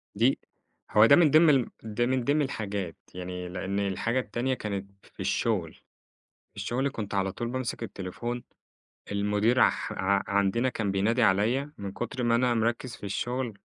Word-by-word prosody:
دي 120 Hz, +6 st, +3 dB, 0.5 s
هو 105 Hz, +1 st, +7 dB
ده 140 Hz, -, +8 dB
من 160 Hz, -5 st, +5 dB
ضمن 160 Hz, +1 st, +7 dB
ال 135 Hz, -5 st, +3 dB, 0.4 s
من 130 Hz, -2 st, +1 dB
ضمن 145 Hz, +4 st, +2 dB
الحاجات 100 Hz, -, -3 dB, 0.2 s
يعني 90 Hz, 0 st, -5 dB
لأن 95 Hz, +2 st, -3 dB
الحاجة 100 Hz, +5 st, 0 dB
التانية 125 Hz, +3 st, -1 dB
كانت 100 Hz, -4 st, -4 dB
في -, -, -24 dB
الشغل، -, -, -1 dB, 0.8 s
الشغل 130 Hz, +4 st, -1 dB
كنت 105 Hz, -5 st, -6 dB
على 95 Hz, -1 st, +1 dB
طول 120 Hz, +4 st, -4 dB
بامسك 125 Hz, -1 st, -3 dB
التليفون، 120 Hz, +5 st, -5 dB, 0.7 s
المدير 105 Hz, +5 st, +2 dB
اح -, -, -4 dB
ع 100 Hz, +1 st, +1 dB
عندنا 100 Hz, +5 st, +2 dB
كان 110 Hz, -5 st, -2 dB
بينادي 110 Hz, +5 st, +1 dB
عليّ 115 Hz, +9 st, +2 dB
من 100 Hz, -1 st, -5 dB
كتر 120 Hz, +3 st, -4 dB
ما 115 Hz, -1 st, +2 dB
أنا 120 Hz, 0 st, +3 dB
مركز 115 Hz, +2 st, -1 dB
في -, -, -12 dB
الشغل، 120 Hz, +1 st, -3 dB
115 Hz, 155 wpm, -28 LUFS, 100-125 Hz, 0.8 s, ده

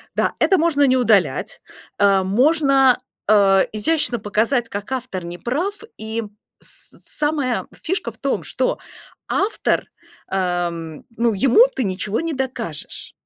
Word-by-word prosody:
Да, -, -, +1 dB
это 380 Hz, -, +4 dB
можно 320 Hz, -3 st, +2 dB
не 260 Hz, -1 st, +3 dB
удалять, 215 Hz, -6 st, +1 dB, 0.4 s
а 195 Hz, -2 st, +4 dB
можно, 270 Hz, -, +3 dB, 0.3 s
а, 195 Hz, -2 st, +5 dB
изящно 240 Hz, +2 st, +1 dB
показать, 225 Hz, +4 st, 0 dB
как 205 Hz, +5 st, -6 dB
автор 250 Hz, -8 st, -4 dB
не 175 Hz, +1 st, -7 dB
прав, 320 Hz, -, -2 dB, 0.2 s
и 220 Hz, +1 st, -4 dB, 0.4 s
с -, -, -11 dB, 0.3 s
самая 295 Hz, -5 st, -1 dB
фишка 375 Hz, +4 st, -2 dB
в -, -, -22 dB
том, -, -, -2 dB
что -, -, -1 dB, 0.5 s
автор, 410 Hz, +3 st, 0 dB, 0.4 s
ам, 175 Hz, -4 st, -2 dB
ну, 235 Hz, -1 st, +2 dB
ему 245 Hz, -, +4 dB
ты 260 Hz, -, 0 dB
ничего 195 Hz, +1 st, -2 dB
не 330 Hz, -1 st, -3 dB
докажешь. 250 Hz, -, -5 dB
235 Hz, 130 wpm, -20 LUFS, 195-275 Hz, 0.5 s, а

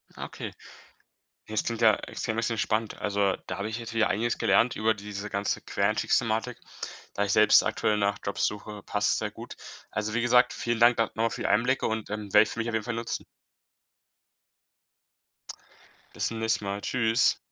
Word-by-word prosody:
Ah, -, -, -5 dB
okay. -, -, -7 dB, 1.0 s
Das 110 Hz, 0 st, -1 dB
klingt 115 Hz, 0 st, -3 dB
ja 110 Hz, -2 st, +7 dB
extrem 110 Hz, 0 st, -4 dB
extrem 115 Hz, 0 st, 0 dB
spannend. 110 Hz, 0 st, -1 dB
Also, 100 Hz, -2 st, +1 dB
da -, -, -4 dB
habe 100 Hz, +2 st, -2 dB
ich 110 Hz, +1 st, -4 dB
jetzt 115 Hz, -1 st, -7 dB
wieder 115 Hz, -1 st, +3 dB
einiges 115 Hz, +3 st, 0 dB
gelernt 105 Hz, +6 st, +3 dB
über 110 Hz, +1 st, +2 dB
diese 105 Hz, 0 st, -6 dB
ganze 100 Hz, 0 st, -1 dB
Quereinstiegsthematik, 110 Hz, +3 st, 0 dB, 0.5 s
da 100 Hz, -, 0 dB
ich 100 Hz, -, -1 dB
selbst 105 Hz, 0 st, +6 dB
aktuell 105 Hz, -1 st, 0 dB
nach 100 Hz, 0 st, +1 dB
Jobs 100 Hz, -, 0 dB
suche, 105 Hz, 0 st, -6 dB
passt -, -, 0 dB
es -, -, +1 dB
sehr -, -, -2 dB
gut. -, -, -10 dB, 0.3 s
Also, 105 Hz, 0 st, -3 dB
wie 120 Hz, -, +1 dB
gesagt, 125 Hz, +1 st, +4 dB
vielen 120 Hz, -1 st, -2 dB
Dank 120 Hz, 0 st, +6 dB
da 115 Hz, -, +3 dB
noch -, -, -20 dB
mal 115 Hz, +1 st, +1 dB
für -, -, -5 dB
die -, -, 0 dB
Einblicke 125 Hz, +5 st, +2 dB
und, 110 Hz, -1 st, -2 dB
ähm, 105 Hz, -2 st, -5 dB
werde 105 Hz, 0 st, +8 dB
ich -, -, -7 dB
für -, -, -7 dB
mich 115 Hz, -, -2 dB
auf 115 Hz, -, -3 dB
jeden 110 Hz, -, 0 dB
Fall 120 Hz, -, -3 dB
nutzen. 115 Hz, 0 st, -4 dB, 2.9 s
Bis -, -, 0 dB
zum 115 Hz, -, -5 dB
nächsten 110 Hz, -2 st, 0 dB
Mal. 100 Hz, +1 st, -3 dB
Tschüss. 115 Hz, 0 st, +2 dB
110 Hz, 195 wpm, -27 LUFS, 105-115 Hz, 2.9 s, werde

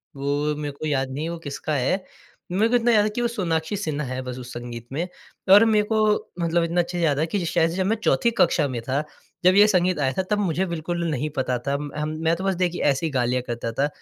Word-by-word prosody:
वो 145 Hz, +2 st, -1 dB
मेरे 145 Hz, -1 st, -4 dB
को -, -, -4 dB
याद 135 Hz, -3 st, 0 dB
नहीं 140 Hz, +3 st, -4 dB
है -, -, -3 dB
वो 170 Hz, -, -5 dB
किसका 150 Hz, 0 st, -4 dB
है, 140 Hz, +9 st, 0 dB, 0.5 s
मेरे 200 Hz, +5 st, +3 dB
को 245 Hz, -, +2 dB
इतना 240 Hz, 0 st, +3 dB
याद 215 Hz, -2 st, +5 dB
है 210 Hz, -, +1 dB
कि 215 Hz, +3 st, -3 dB
वो 240 Hz, -, +2 dB
सोनाक्षी 170 Hz, -5 st, -1 dB
सिन्हा 155 Hz, -6 st, -2 dB
है 130 Hz, +1 st, -3 dB
बस 125 Hz, -1 st, -6 dB
उस 125 Hz, -1 st, -8 dB
संगीत 120 Hz, -1 st, -7 dB
में। 165 Hz, +6 st, -2 dB, 0.4 s
और 205 Hz, +3 st, +9 dB
मेरे 215 Hz, -2 st, +3 dB
को 220 Hz, -, +3 dB, 0.4 s
मतलब 170 Hz, 0 st, +1 dB
इतना 170 Hz, +1 st, +1 dB
अच्छा 175 Hz, +1 st, -5 dB
याद 150 Hz, -4 st, +2 dB
है 155 Hz, -, +2 dB
कि 185 Hz, +1 st, -2 dB
शायद 165 Hz, 0 st, +2 dB
से -, -, -5 dB
जब 190 Hz, -, +1 dB
मैं 215 Hz, +4 st, +2 dB
चौथी 235 Hz, 0 st, +3 dB
कक्षा 155 Hz, -5 st, +3 dB
में 125 Hz, -4 st, -4 dB
था 135 Hz, +5 st, -1 dB, 0.4 s
जब 185 Hz, +1 st, +5 dB
ये 205 Hz, +1 st, +7 dB
संगीत 180 Hz, -4 st, +2 dB
आया 135 Hz, -2 st, +1 dB
था 190 Hz, -, +1 dB
तब 210 Hz, -, +2 dB
मुझे 185 Hz, -2 st, 0 dB
बिल्कुल 170 Hz, 0 st, -3 dB
नहीं 150 Hz, 0 st, -1 dB
पता 130 Hz, -1 st, 0 dB
था। 140 Hz, 0 st, +1 dB
म 145 Hz, 0 st, -5 dB
हम 150 Hz, 0 st, -2 dB
मैं 165 Hz, +1 st, +3 dB
तो 185 Hz, -, -6 dB
बस 195 Hz, -1 st, +1 dB
देखिए 175 Hz, 0 st, -1 dB
ऐसी 145 Hz, +3 st, +2 dB
गा 130 Hz, -4 st, 0 dB
लिया 125 Hz, +1 st, 0 dB
करता 120 Hz, -1 st, -4 dB
था, 140 Hz, +5 st, +1 dB
160 Hz, 265 wpm, -24 LUFS, 140-185 Hz, 0.5 s, और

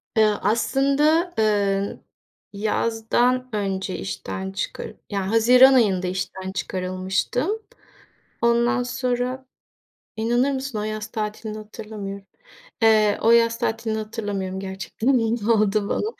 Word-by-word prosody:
Eee, 220 Hz, -, +5 dB, 0.2 s
aslında, 280 Hz, -, +2 dB
eee, 200 Hz, -2 st, +1 dB, 0.5 s
yazdan 230 Hz, +4 st, 0 dB
önce 195 Hz, -2 st, -2 dB
işten 95 Hz, 0 st, -5 dB
çıkar -, -, -5 dB, 0.2 s
Yani, 195 Hz, -2 st, -2 dB
haziran 250 Hz, +4 st, +7 dB
ayında 195 Hz, -7 st, +3 dB
işten 190 Hz, +1 st, -4 dB
çıkarılmıştım. 185 Hz, -, -2 dB, 0.9 s
Ondan 235 Hz, +2 st, +3 dB
sonra 250 Hz, +1 st, -2 dB, 0.7 s
inanır 240 Hz, +5 st, +1 dB
mısın 265 Hz, -3 st, -4 dB
o -, -, -2 dB
yaz 215 Hz, 0 st, -4 dB
tatilini 215 Hz, 0 st, -4 dB
hatırlamıyorum. 210 Hz, -2 st, -8 dB, 0.6 s
Eee, 215 Hz, -2 st, +4 dB
o 230 Hz, -, +4 dB
yaz 230 Hz, 0 st, +4 dB
tatilini 225 Hz, -1 st, -1 dB
hatırlamıyorum 205 Hz, -3 st, -4 dB
gerçekten. 195 Hz, +7 st, -1 dB
Ne 225 Hz, -1 st, 0 dB
oldu 210 Hz, -1 st, +2 dB
bana? -, -, 0 dB
220 Hz, 105 wpm, -23 LUFS, 195-240 Hz, 0.9 s, haziran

